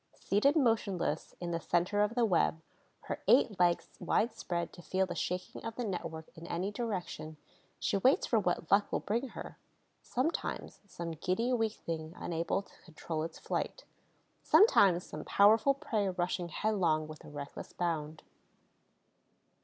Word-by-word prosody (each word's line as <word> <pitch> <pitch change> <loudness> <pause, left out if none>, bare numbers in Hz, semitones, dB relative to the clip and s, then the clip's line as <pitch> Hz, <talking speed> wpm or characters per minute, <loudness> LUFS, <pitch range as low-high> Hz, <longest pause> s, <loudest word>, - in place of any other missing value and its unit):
Seated 245 +10 +2
motionless 220 - +1
in 175 -1 -3
the 165 - -1
center 175 +5 +1
of 210 +2 +1
the 240 -2 +4
web, 170 -4 +2 0.4
her - - -5
eight 205 -4 +4
legs 175 -1 +3
widespread 210 -7 -1
to - - -11
feel 190 +3 0
the 180 - -5
shaking 180 +1 -4
of 225 0 -5
the 245 - -3
network 165 -5 -5
in 165 +1 -10
any 180 +4 -2
direction, 185 -8 -4 0.4
she - - 0
waits 255 +8 +4
for 230 - +3
what 175 -4 -1
luck 200 +1 +4
will - - +1
bring 235 +6 -1
her: - - -9 0.4
sometimes 265 +7 -2
some 170 -3 -5
giddy 185 +10 0
weak 225 -3 +1
thing 160 -3 -5
unable 170 +3 -1
to - - -22
control 160 -1 -5
its 165 +1 -5
flight, - - -3 0.6
sometimes 195 - +5
some - - -7
powerful 220 +7 +5
prey 225 -9 -1
rushing 180 -1 -2
headlong 170 -6 +1
with 155 0 -10
a - - -11
reckless 145 -1 -7
bound. 160 -3 -3
185 Hz, 155 wpm, -32 LUFS, 165-220 Hz, 0.6 s, sometimes